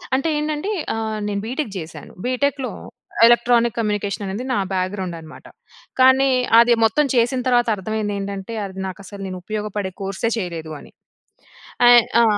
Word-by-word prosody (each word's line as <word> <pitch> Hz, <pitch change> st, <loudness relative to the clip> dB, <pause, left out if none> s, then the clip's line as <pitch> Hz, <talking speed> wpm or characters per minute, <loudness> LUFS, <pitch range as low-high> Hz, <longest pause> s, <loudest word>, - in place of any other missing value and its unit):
అంటే 270 Hz, +4 st, 0 dB
ఏంటంటే, 300 Hz, +6 st, -2 dB, 0.2 s
ఆహ్, 220 Hz, -1 st, -3 dB
నేను 200 Hz, -1 st, -2 dB
బీటెక్ 255 Hz, 0 st, -3 dB
చేశాను. 160 Hz, -1 st, -10 dB
బీటెక్‍లో, 265 Hz, +1 st, -1 dB, 0.6 s
ఎలక్ట్రానిక్ 235 Hz, -1 st, +3 dB
కమ్యూనికేషన్ 210 Hz, -2 st, -2 dB
అనేది 200 Hz, +6 st, -4 dB
నా -, -, +1 dB, 0.2 s
బ్యాక్‌గ్రౌండ్ 185 Hz, -1 st, -2 dB
అనమాట. 160 Hz, -1 st, -13 dB, 0.6 s
కానీ, 265 Hz, +1 st, +5 dB, 0.3 s
అది 235 Hz, +1 st, +6 dB
మొత్తం 260 Hz, +7 st, +2 dB
చేసిన 245 Hz, +2 st, +2 dB
తర్వాత 240 Hz, -1 st, +3 dB
అర్థమైంది 210 Hz, +1 st, -3 dB
ఏంటంటే, 200 Hz, +2 st, -5 dB
అది 190 Hz, -1 st, -8 dB
నాకు 190 Hz, +1 st, -8 dB
అసలు 200 Hz, 0 st, -10 dB
నేను 185 Hz, -1 st, -6 dB
ఉపయోగపడే 210 Hz, -1 st, -4 dB
కోర్సే 195 Hz, +4 st, -2 dB
చేయలేదు 165 Hz, -6 st, -5 dB
అని. -, -, -15 dB, 1.0 s
ఆహ్, 240 Hz, -1 st, +8 dB, 0.2 s
ఆ! -, -, +5 dB
220 Hz, 145 wpm, -21 LUFS, 195-245 Hz, 1.0 s, ఆహ్